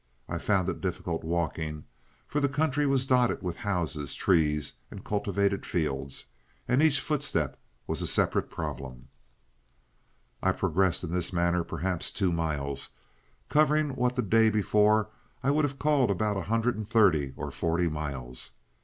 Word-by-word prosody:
I - - -3
found 95 -4 +1
it 95 - -3
difficult 85 -3 -3
walking, 80 -2 -2 0.4
for 150 - -1
the 140 -1 +2
country 145 +1 +1
was 135 -1 +2
dotted 125 -4 +2
with 90 -2 -3
houses, 85 -8 -2
trees, 75 -5 +1
and - - -10
cultivated 100 -1 0
fields, 70 -5 -2 0.4
and 125 +3 +3
each 155 -3 +4
footstep 135 - -1 0.3
was - - -3
a - - -1
separate - - +1
problem. 65 0 -6 1.3
"I - - +3
progressed 95 -3 +1
in 85 - -4
this 90 +1 -1
manner 85 -1 +1
perhaps 90 0 -2
two 95 -4 0
miles, 75 -4 -2 0.6
covering 150 0 +3
what 125 -1 +1
the 125 - +1
day 110 +2 +4
before 105 0 +3 0.3
I 135 - +3
would 150 +1 +3
have 140 -1 -4
called 145 -5 +3
about 105 +2 +1
a 95 - -1
hundred 115 +2 +2
and 110 -2 -5
thirty 85 - +3
or - - -4
forty 85 +1 0
miles. 70 -6 -4
95 Hz, 155 wpm, -28 LUFS, 80-125 Hz, 1.3 s, each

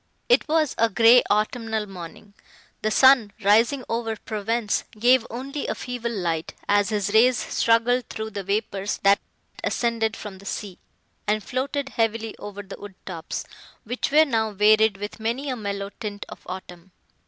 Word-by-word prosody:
It - - +4
was 310 -2 +2
a 230 0 +4
grey 230 +4 +7
autumnal 220 +1 0
morning. 195 +1 -10 0.5
The 215 - +1
sun, 250 -3 +5
rising 230 +7 +4
over 230 -1 -2
Provence, 220 0 -2 0.2
gave 245 +1 +4
only 270 +5 -5
a - - -2
feeble 245 -2 -4
light, 170 -7 -2
as 205 0 +3
his 205 -2 -1
rays 240 +2 +5
struggled 235 +2 +1
through 220 0 -5
the 200 -1 -5
vapours 200 0 -2
that 200 0 +5 0.4
ascended 225 -2 0
from 200 -3 -8
the 200 - -15
sea, 195 -2 -5 0.5
and 210 0 +1
floated 275 +3 -2
heavily 225 -2 -1
over 205 0 -7
the 195 - -10
wood 205 -2 -9
tops, 170 -3 -5 0.4
which 245 +3 -2
were 310 +2 +6
now 220 -6 0
varied 215 0 +4
with 205 0 -7
many 245 +6 -2
a - - -2
mellow 200 -3 -4
tint 205 -3 -5
of - - -10
autumn. 180 -1 -8
220 Hz, 160 wpm, -24 LUFS, 205-240 Hz, 0.5 s, grey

